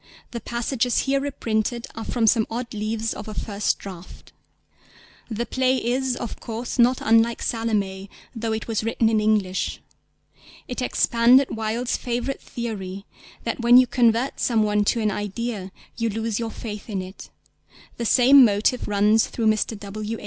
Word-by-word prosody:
The 235 - -5
passages 240 +1 0
here 275 0 +1
reprinted 235 -4 -2
are 225 - -6
from 235 -1 0
some 220 0 +3
odd 235 +1 -5
leaves 220 +1 -2
of 210 - -8
a 215 - -7
first 205 -1 -1
draft. 185 -3 -11 1.0
The 230 +1 -2
play 260 +1 +1
is, 255 +1 0
of 235 - -6
course, 235 +2 -5
not 245 +2 +5
unlike 225 +1 +3
Salomé, 200 -4 -2 0.3
though 225 0 -2
it 220 0 -3
was 225 -2 -1
written 225 0 +1
in 220 -1 +2
English. 205 -4 0 0.9
It 250 - -4
expanded 250 +1 +3
Wilde's 225 +3 -1
favourite 245 +2 -3
theory 200 -5 -6 0.4
that 230 - -3
when 240 +1 +6
you 255 - +7
convert 240 +1 +1
some 225 -3 +2
one 210 0 +2
to 230 - +1
an 215 -1 +1
idea, 205 -1 -4 0.3
you 230 -1 0
lose 225 0 -2
your 230 -1 -2
faith 210 -1 -8
in 195 -3 -2
it; 185 +1 -11 0.7
the 235 - -3
same 265 +3 +7
motive 215 +3 +2
runs 210 +2 +3
through 230 - -3
_Mr. 215 0 +1
W. 210 +2 -5
225 Hz, 160 wpm, -23 LUFS, 210-240 Hz, 1.0 s, you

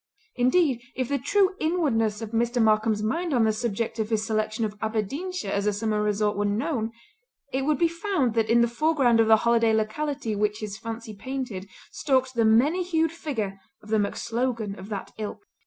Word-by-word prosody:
Indeed, 255 0 +2
if 255 -2 -2
the 280 -1 0
true 385 +8 +2
inwardness 230 - +1
of 220 - -6
Mr. 235 +1 0
Markam's 215 -1 +3
mind 330 +7 0
on 235 - +4
the 220 -1 +3
subject 225 0 -2
of 220 -1 -1
his 220 -1 0
selection 220 0 -1
of 210 -1 -5
Aberdeenshire 225 - -2
as 200 +1 0
a 210 - +2
summer 210 0 -1
resort 210 0 +1
were 205 +1 0
known, 225 +2 -1 0.6
it 265 +1 0
would 300 -1 +2
be 340 - +3
found 335 - -1
that 225 -1 +1
in 235 +1 +5
the 235 - +4
foreground 255 -2 +2
of 225 - +4
the 220 0 +7
holiday 230 -1 +4
locality 225 +2 -1
which 210 0 0
his 210 -2 -5
fancy 225 0 -7
painted 220 -4 -5 0.2
stalked 260 -3 +1
the 230 -2 +2
many 265 +11 +4
hued 325 -3 +1
figure 225 -12 -4 0.2
of 210 - -14
the 220 0 +2
MacSlogan 225 0 -2
of 190 +2 -9
that 200 -3 -5
Ilk. 215 - -5
230 Hz, 190 wpm, -26 LUFS, 215-270 Hz, 0.6 s, the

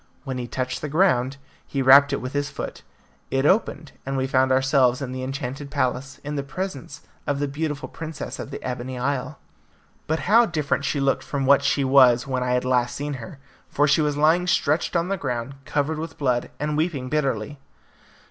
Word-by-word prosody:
When 130 -3 -4
he 120 - -4
touched 130 +1 -3
the 150 - -4
ground, 140 -6 +2 0.3
he 135 -1 -1
rapped 140 +2 +7
it 140 - -1
with 130 +1 -5
his 145 0 -1
foot; - - -6 0.5
it 135 +1 0
opened, 160 -4 +1
and 135 0 -3
we 130 - 0
found 130 -1 +2
ourselves 130 -1 +3
in 135 -3 -5
the 130 0 -5
enchanted 135 +1 -5
palace, 135 -1 -2
in 145 +1 -4
the 140 - -1
presence 145 -1 -6 0.2
of 145 - 0
the 145 +1 -1
beautiful 150 +1 -3
princess 160 -1 -7
of - - -6
the - - -6
Ebony 125 0 -4
Isle. 130 +2 -2 0.7
But 160 +1 0
how 230 +2 +5
different 150 -4 -1
she 145 - 0
looked 135 0 +1
from 140 -2 -2
what 140 +1 +5
she 140 - +2
was 130 -3 +5
when 130 -2 -2
I 125 0 0
had 125 0 0
last 125 -1 +1
seen 145 +1 -3
her, 115 +5 -9 0.3
for 145 +1 +2
she 145 +2 +4
was 150 -1 0
lying 165 +4 +3
stretched 175 -1 +1
on 170 +1 +1
the 195 - 0
ground 120 -4 -3
covered 150 +2 -1
with 165 +1 -6
blood, 125 -4 0
and 150 0 -1
weeping 155 -5 -1
bitterly. 135 -2 -1
140 Hz, 200 wpm, -24 LUFS, 130-150 Hz, 0.7 s, rapped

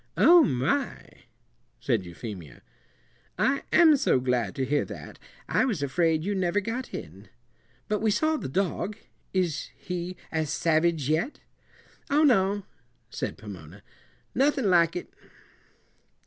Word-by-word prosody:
"Oh, 345 -1 +7
my!" 140 - -2 0.5
said 115 -7 -1
Euphemia, 85 - -9 0.7
"I 275 +1 +2
am 320 -3 +7
so 260 - +2
glad 125 -6 -1
to 135 - -1
hear 145 +2 +1
that. - - -10 0.3
I - - +2
was 210 - -1
afraid 160 +2 +1
you 205 +3 -1
never 185 0 +1
got 230 +5 -4
in. 95 +7 -9 0.6
But 210 -1 0
we 220 - +1
saw 315 +9 +2
the - - -5
dog 190 +5 -1 0.3
is 175 -5 -1
he 180 0 -5
as 160 -2 -1
savage 160 -1 +1
yet?" 160 - -1 0.7
"Oh, 295 +2 +3
no!" 200 -7 +3 0.5
said - - -4
Pomona; 95 -2 -11 0.5
"nothin' 270 -5 +2
like 170 -1 +4
it." 180 - -6
170 Hz, 130 wpm, -27 LUFS, 130-215 Hz, 0.7 s, Oh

